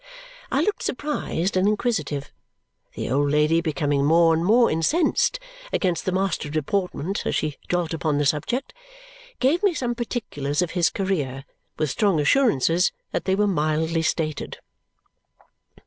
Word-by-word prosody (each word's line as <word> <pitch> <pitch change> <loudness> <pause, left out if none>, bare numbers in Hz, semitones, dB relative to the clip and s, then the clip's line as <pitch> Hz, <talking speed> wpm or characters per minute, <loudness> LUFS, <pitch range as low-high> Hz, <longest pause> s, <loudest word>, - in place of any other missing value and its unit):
I - - +2
looked 420 - 0
surprised 250 - -2
and 185 +2 +3
inquisitive. 170 - -1 0.6
The - - -4
old 145 +2 +2
lady, 150 +3 +3
becoming 145 -3 0
more 165 +2 +5
and 165 +1 0
more 230 +6 +4
incensed 315 - +1 0.3
against 180 -3 0
the 185 - 0
master 190 -4 -1
of 145 - -7
deportment 180 +3 -2
as - - -1
she 155 -2 -2
dwelt 175 -2 0
upon 155 -3 0
the 145 - +1
subject, 195 - -1 0.7
gave 280 +7 +2
me 400 -5 +2
some 245 -4 -1
particulars 180 - -2
of 175 - -4
his 170 -4 +2
career, 145 -10 -2 0.3
with 155 -2 0
strong 200 -7 +2
assurances 165 - +3 0.2
that - - -2
they 190 - +2
were 210 +1 +2
mildly 160 -2 0
stated. 160 -2 -2
165 Hz, 145 wpm, -24 LUFS, 150-205 Hz, 0.7 s, more